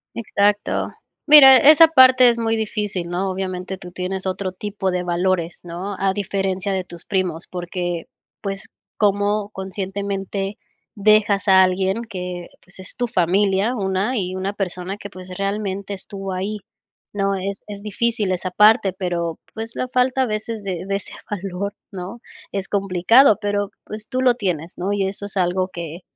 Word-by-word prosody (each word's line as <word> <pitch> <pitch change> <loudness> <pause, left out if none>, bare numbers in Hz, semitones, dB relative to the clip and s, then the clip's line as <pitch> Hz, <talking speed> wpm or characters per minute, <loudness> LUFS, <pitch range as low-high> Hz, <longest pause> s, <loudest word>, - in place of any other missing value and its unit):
Exacto. 205 -2 0 0.3
Mira, 275 -3 +10
esa 310 +4 +8
parte 260 -4 +7
es 235 - +1
muy 225 -1 0
difícil, 210 -5 -2
¿no?, 185 +2 -1
obviamente, 185 0 -4
tú 180 -1 -10
tienes 185 +1 -4
otro 190 0 -2
tipo 195 0 -3
de 180 0 -1
valores, 175 -1 0
¿no?, 180 +4 -5
a 195 0 +1
diferencia 195 -1 -2
de 190 -1 -2
tus 175 -1 -10
primos, 180 -4 -1
porque, 175 -1 -4 0.3
pues, 195 -1 -4 0.3
cómo 205 0 +1
conscientemente 195 0 -4 0.4
dejas 210 -1 +3
a 190 0 +8
alguien 190 +4 0
que, 180 -3 -5 0.2
pues, 190 0 -11
es 185 - -7
tu 245 - -1
familia, 195 +2 +2
una 195 +4 -1
y 185 -2 -2
una 190 +2 -3
persona 185 -1 -4
que, 200 - -9
pues, 185 -1 -10
realmente 200 0 -3
estuvo 195 0 -6
ahí, 195 +3 -3 0.5
¿no?, 195 -1 0
es 195 +1 -4
es 200 -1 -8
difícil 215 -1 0
esa 185 0 -2
parte, 210 0 +5
pero, 170 -3 -2 0.2
pues, 225 +1 -6
la 255 - -3
falta 255 +1 +2
a 260 - +2
veces 215 0 -4
de 185 -3 -4
de 195 - 0
ese 200 - -5 0.2
valor, 200 0 -4 0.2
¿no?, 195 +4 -7 0.3
es 195 -1 -3
complicado, 200 +5 +4
pero, 205 -1 -1
pues, 215 0 -8
tú 255 -1 -2
lo 250 -2 +4
tienes, 175 -7 -3
¿no?, 190 +3 -1
y 200 -1 0
eso 195 +1 -4
es 205 - -7
algo 185 0 +1
que, 170 -2 -7
195 Hz, 165 wpm, -21 LUFS, 185-210 Hz, 0.5 s, Mira